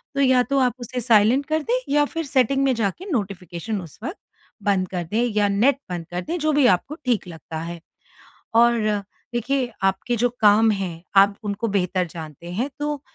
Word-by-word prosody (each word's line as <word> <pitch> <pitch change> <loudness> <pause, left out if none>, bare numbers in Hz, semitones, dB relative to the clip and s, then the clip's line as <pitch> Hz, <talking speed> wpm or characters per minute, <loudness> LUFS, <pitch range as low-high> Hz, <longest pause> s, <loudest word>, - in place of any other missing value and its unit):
तो 280 - +1
या 255 -2 +4
तो 275 +1 0
आप 250 -2 +2
उसे 245 +1 -4
साइलेंट 230 +3 +4
कर 315 +1 -1
दें 485 +7 +1 0.2
या 295 0 +4
फिर 330 +2 -4
सेटिंग 270 0 +2
में 270 -1 +3
जाके 225 - -2
नोटिफ़िकेशन 195 - -3
उस 165 -5 -13
वक़्त 345 - -4 0.5
बंद 195 -2 +1
कर 180 -2 -3
दें 230 +3 +2
या 205 -1 +3
नेट 235 +8 +3
बंद 175 -2 -4
कर 180 +1 -2
दें 340 - -3
जो 310 0 +1
भी 290 -2 +4
आपको 190 +10 +1
ठीक 235 -7 0
लगता 160 -1 -8
है। 170 +1 -6 0.8
और 235 +1 +5 0.6
देखिए 250 +1 0
आपके 195 +5 0
जो 245 +2 +2
काम 215 +1 +6
हैं, 185 -5 -3
आप 200 +1 +6
उनको 210 +2 -2
बेहतर 185 -2 0
जानते 160 0 -9
हैं। 235 +9 -1
तो 295 -1 -2
225 Hz, 190 wpm, -23 LUFS, 190-270 Hz, 0.8 s, काम